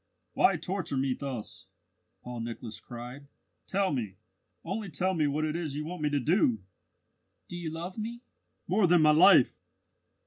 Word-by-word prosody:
"Why -, -, +4 dB
torture 185 Hz, -7 st, -3 dB
me 135 Hz, 0 st, +1 dB
thus?" 130 Hz, -5 st, -7 dB, 0.6 s
Paul 125 Hz, -1 st, -6 dB
Nicholas 115 Hz, -1 st, -6 dB
cried. 125 Hz, +4 st, -9 dB, 0.4 s
"Tell 195 Hz, -3 st, +1 dB
me 110 Hz, -8 st, -3 dB, 0.5 s
only 195 Hz, +3 st, -4 dB
tell 180 Hz, +5 st, 0 dB
me 155 Hz, -4 st, +2 dB
what 150 Hz, +2 st, 0 dB
it 155 Hz, 0 st, -2 dB
is 160 Hz, -5 st, -3 dB
you 150 Hz, +1 st, -3 dB
want 175 Hz, 0 st, -6 dB
me 150 Hz, -, +1 dB
to 145 Hz, -1 st, +1 dB
do!" 130 Hz, -, +2 dB, 0.8 s
"Do -, -, -8 dB
you 170 Hz, -2 st, -4 dB
love 170 Hz, +6 st, -6 dB
me?" 235 Hz, +2 st, -5 dB, 0.5 s
"More 185 Hz, +2 st, +3 dB
than 175 Hz, -2 st, +5 dB
my 155 Hz, -, +7 dB
life." 165 Hz, -3 st, +7 dB
155 Hz, 165 wpm, -29 LUFS, 130-180 Hz, 0.8 s, my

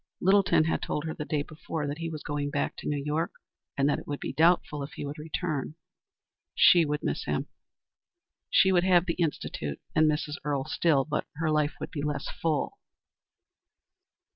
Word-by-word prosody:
Littleton 195 Hz, -3 st, +4 dB
had 160 Hz, -, 0 dB
told 150 Hz, -, -2 dB
her 160 Hz, -, -3 dB
the 150 Hz, -, -5 dB
day 150 Hz, -2 st, -1 dB
before 155 Hz, 0 st, -5 dB
that 145 Hz, +2 st, -4 dB
he 165 Hz, 0 st, -3 dB
was 155 Hz, -2 st, -6 dB
going 145 Hz, -1 st, -2 dB
back 145 Hz, 0 st, -1 dB
to -, -, -6 dB
New 145 Hz, -, 0 dB
York 155 Hz, +3 st, -1 dB, 0.4 s
and 140 Hz, 0 st, +3 dB
that 145 Hz, -, +1 dB
it -, -, -13 dB
was 145 Hz, -, -2 dB, 0.2 s
doubtful 160 Hz, -2 st, +3 dB
if 140 Hz, -, -6 dB
he -, -, -5 dB
would 145 Hz, +2 st, -6 dB
return. 155 Hz, -2 st, -3 dB, 0.8 s
She 170 Hz, -2 st, +7 dB
would 150 Hz, 0 st, -2 dB
miss -, -, -2 dB
him. -, -, -2 dB, 1.0 s
She 190 Hz, -, +5 dB
would 175 Hz, -2 st, +4 dB
have 180 Hz, -2 st, +4 dB
the 170 Hz, -, 0 dB
Institute 75 Hz, -, -2 dB
and 155 Hz, -1 st, +4 dB
Mrs. 150 Hz, -1 st, -1 dB
Earle 140 Hz, -2 st, -1 dB
still, 145 Hz, -6 st, +2 dB
but 150 Hz, -1 st, -2 dB
her 160 Hz, 0 st, 0 dB
life 150 Hz, -1 st, +1 dB
would -, -, -5 dB
be 145 Hz, -, -4 dB
less 145 Hz, -1 st, -2 dB
full. 155 Hz, -4 st, -2 dB
150 Hz, 185 wpm, -28 LUFS, 145-165 Hz, 1.0 s, She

